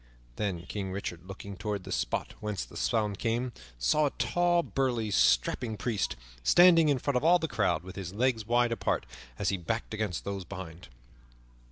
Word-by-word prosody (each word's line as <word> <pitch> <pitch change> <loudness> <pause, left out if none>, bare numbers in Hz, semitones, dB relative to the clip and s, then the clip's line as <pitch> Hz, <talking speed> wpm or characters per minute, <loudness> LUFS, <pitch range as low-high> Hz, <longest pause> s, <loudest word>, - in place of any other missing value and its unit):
Then 95 -5 -2
King 95 0 -4
Richard, 90 -3 -5
looking 100 +1 -8
toward 100 +2 -3
the - - -8
spot - - -1
whence 105 -3 -3
the - - -15
sound 105 -3 0
came, 120 +2 -1 0.2
saw 145 - +3
a - - -6
tall, 175 -1 +2
burly, 120 -8 -1
strapping 110 - +2
priest 110 -4 -1 0.3
standing 165 - +6
in 140 - +3
front 135 0 0
of 125 - -1
all 170 +2 +6
the 160 - -2
crowd 115 - 0
with 95 +1 -9
his 95 -3 -5
legs 115 +2 +1
wide 120 0 +3
apart 115 - 0 0.3
as - - 0
he 100 - 0
backed 110 +7 -3
against 105 -4 -2
those 100 -1 -4
behind. 90 -4 -8
105 Hz, 180 wpm, -30 LUFS, 95-125 Hz, 0.3 s, standing